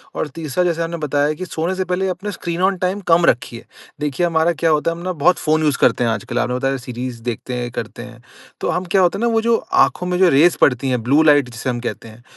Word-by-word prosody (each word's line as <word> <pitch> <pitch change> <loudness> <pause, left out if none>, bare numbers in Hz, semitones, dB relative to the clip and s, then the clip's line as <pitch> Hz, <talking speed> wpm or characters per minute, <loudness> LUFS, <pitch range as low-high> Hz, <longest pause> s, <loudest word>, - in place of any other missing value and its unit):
और - - -2
तीसरा 155 +2 -3
जैसा 170 -2 0
हमने 170 +1 -4
बताया 145 0 0
कि 185 +4 -6
सोने 170 +1 -3
से 185 0 -2
पहले 180 +1 -1
अपने 195 +3 -4
स्क्रीन 170 -1 -4
ऑन 190 0 +2
टाइम 185 +3 -1
कम 170 0 +4
रखिए। 120 -3 0 0.3
देखिए 150 +3 -1
हमारा 165 0 +2
क्या 165 - +4
होता 155 +1 +1
है 165 - -6
हम 170 - -9
ना 185 - -2
बहुत 175 +3 +2
फ़ोन 155 0 +1
यूज़ 150 -3 +1
करते 125 0 +3
हैं 115 - +1
आजकल 120 +2 -3
आपने 125 +1 -1
बताया 135 +1 -1
सीरीज़ 125 -1 -6
देखते 125 +1 -4
हैं 120 0 -3
करते 120 +1 -6
हैं। 120 -1 -13 0.4
तो - - -1
हम 180 +1 -1
क्या 190 - +5
होता 180 +1 +2
है - - -5
ना 235 - +2
वो 225 - +2
जो 230 0 +2 0.3
आँखों 180 - -5
में 180 0 -1
जो 185 -1 +5
रेज़ 160 +4 +4
पड़ती 130 0 +3
हैं, 125 -2 0
ब्लू 140 +6 +3
लाइट 145 -4 +4
जिसे 120 +3 -5
हम 120 -1 -2
कहते 120 -1 -6
हैं 115 +2 -15
155 Hz, 265 wpm, -19 LUFS, 125-180 Hz, 0.4 s, क्या